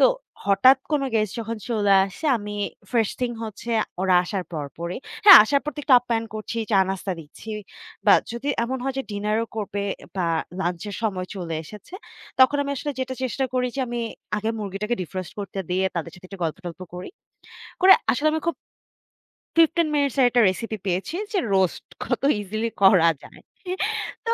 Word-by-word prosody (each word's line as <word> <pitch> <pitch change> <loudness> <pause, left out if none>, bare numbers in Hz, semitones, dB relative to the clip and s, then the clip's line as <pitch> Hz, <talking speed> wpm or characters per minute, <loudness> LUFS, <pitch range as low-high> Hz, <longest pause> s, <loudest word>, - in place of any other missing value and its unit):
তো - - +7 0.4
হঠাৎ 250 +7 +6
কোন 290 -2 +2
গেস্ট 215 -2 +1
যখন 225 +1 -4
চলে 205 -4 +2
আসে 195 - -9
আমি 205 -1 -6 0.4
first 225 -3 +1
thing 240 -1 -1
হচ্ছে 220 +2 -7 0.3
ওরা 185 -1 +3
আসার 190 0 -3
পর 150 -3 -3
পরই। 170 +4 -4 0.3
হ্যাঁ, 390 -4 +12
আসার 280 +5 +2
পর 300 - -2
তো - - -12
একটু 270 - +5
আপ্যায়ন 230 -2 -1
করছি, 215 +2 -4
চা-নাস্তা 190 0 +1
দিচ্ছি। 160 +8 -11 0.6
বা, - - +8 0.2
যদি 245 +5 -4 0.2
এমন 260 +2 -3
হয় 270 - -2
যে - - 0
ডিনার 210 +1 -1
ও - - -14
করবে 205 -1 -3 0.3
বা, 180 -2 0 0.3
লাঞ্চ 175 -2 -2
এর - - -6
সময় 185 -4 -1
চলে 170 -4 -4
এসেছে। 210 - -12 0.5
তখন 275 +3 +6
আমি 280 - -4
আসলে 290 - -3
যেটা 260 0 -3
চেষ্টা 260 +1 -1
করি 250 0 +1
যে - - 0
আমি 240 0 -3 0.4
আগে 220 +2 -1
মুরগিটাকে 210 +3 -3
defrost 185 +3 -6
করতে 195 -1 -5
দিয়ে 185 +1 +1
তাদের 170 0 -3
সাথে 180 +1 -14
একটু 195 - -10
গল্প-টল্প 175 +2 -5
করি। 180 +1 -7 0.7
করে, 380 +1 +9 0.2
আসলে 290 +5 +1
আমি 315 - 0
খুব 335 - +1 1.0
15 330 0 +4
minutes 280 -3 +1
আর 260 - +6
একটা 245 0 +3
রেসিপি 220 +3 -4
পেয়েছি 190 - -2 0.2
যে, 390 - +2 0.2
রোস্ট 190 -2 +1 0.2
কত - - -2 0.2
easily 215 +3 -3
করা 185 -4 +7
যায়। - - -14 0.9
তো। 460 - +3
215 Hz, 180 wpm, -24 LUFS, 190-255 Hz, 1.0 s, হ্যাঁ